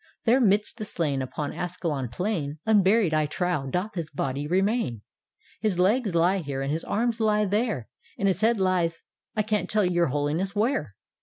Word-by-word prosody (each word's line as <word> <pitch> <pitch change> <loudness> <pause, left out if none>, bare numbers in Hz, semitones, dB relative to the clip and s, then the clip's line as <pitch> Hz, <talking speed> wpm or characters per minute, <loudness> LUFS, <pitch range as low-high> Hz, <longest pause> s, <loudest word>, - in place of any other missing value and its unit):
There 250 +3 +4
midst 205 0 +2
the 215 - -4
slain 150 -9 -1
Upon 145 +3 -4
Ascalon 155 -7 -3
plain, 155 - -2
Unburied, 205 -3 +4
I 155 -1 +2
trow, 150 -2 -1
doth 185 +9 -2
his 165 -4 -4
body 140 0 -3
remain 190 - 0 0.6
His 210 -5 0
legs 200 +1 +2
lie 175 +4 +3
here 140 -5 -4
and 135 - -2
his 160 +2 -2
arms 235 +2 -1
lie 210 -1 +2
there, 205 - -1 0.3
And 200 - +1
his 190 +1 +1
head 225 0 +3
lies 180 -3 +1 0.2
— - - -55
I 215 - +3
can't 215 0 -1
tell 210 -2 +2
your 175 -1 +2
Holiness 150 +8 -1
where 205 - 0
180 Hz, 180 wpm, -26 LUFS, 150-210 Hz, 0.6 s, There